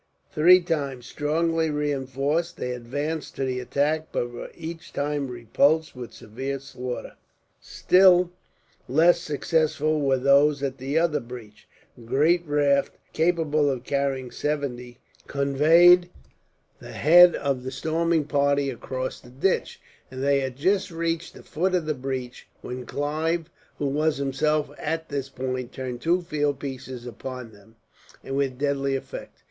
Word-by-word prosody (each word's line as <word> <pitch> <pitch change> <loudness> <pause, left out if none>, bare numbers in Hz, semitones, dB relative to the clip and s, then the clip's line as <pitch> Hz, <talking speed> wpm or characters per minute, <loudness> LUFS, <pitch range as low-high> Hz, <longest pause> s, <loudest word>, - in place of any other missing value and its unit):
Three 180 +4 +6
times, 140 -8 -3
strongly 160 +3 0
reinforced, 145 +2 -1
they 125 - -3
advanced 145 +6 -4
to 135 - -2
the 130 -1 -2
attack; 150 +5 0
but 120 0 -2
were 120 - -8
each 165 0 -8
time 145 -1 -1
repulsed, 140 +6 +1
with 125 -2 -8
severe 130 +6 -5
slaughter. 125 -2 -7 0.5
Still 180 -1 +4 0.6
less 170 +6 +5
successful 155 +1 0
were 135 -2 +2
those 140 +2 +4
at 135 -1 -3
the 135 +4 -2
other 160 -3 +2
breach. 120 -4 -11 0.3
A - - -16
great 150 +9 +2
raft, 145 -1 +2 0.2
capable 160 -3 +2
of 130 -3 -3
carrying 135 -2 -1
seventy, 125 -5 -3 0.3
conveyed 160 +6 +5 0.7
the - - -10
head 175 +3 +7
of 140 -3 -1
the 130 - -4
storming 160 +3 0
party 140 -1 +1
across 130 +1 -5
the 120 - -16
ditch; 140 +10 -1 0.3
and 130 +1 -6
they 140 0 +3
had 130 -2 -3
just 190 +9 +1
reached 165 0 -3
the - - -13
foot 185 +4 -1
of 175 -3 0
the 155 - 0
breach, 130 -2 -5 0.2
when 125 0 -6
Clive, 160 +3 -2 0.3
who 145 - -2
was 150 +2 +1
himself 145 +2 0
at 160 +1 -3
this 140 -2 -3
point, 130 -2 -4
turned 125 -2 -6
two 175 +2 +1
field 150 -4 -1
pieces 130 -3 -7
upon 125 0 -7
them, 105 +2 -20 0.5
with 135 -1 -2
deadly 140 -1 0
effect. 135 - -7
140 Hz, 140 wpm, -25 LUFS, 130-160 Hz, 0.7 s, head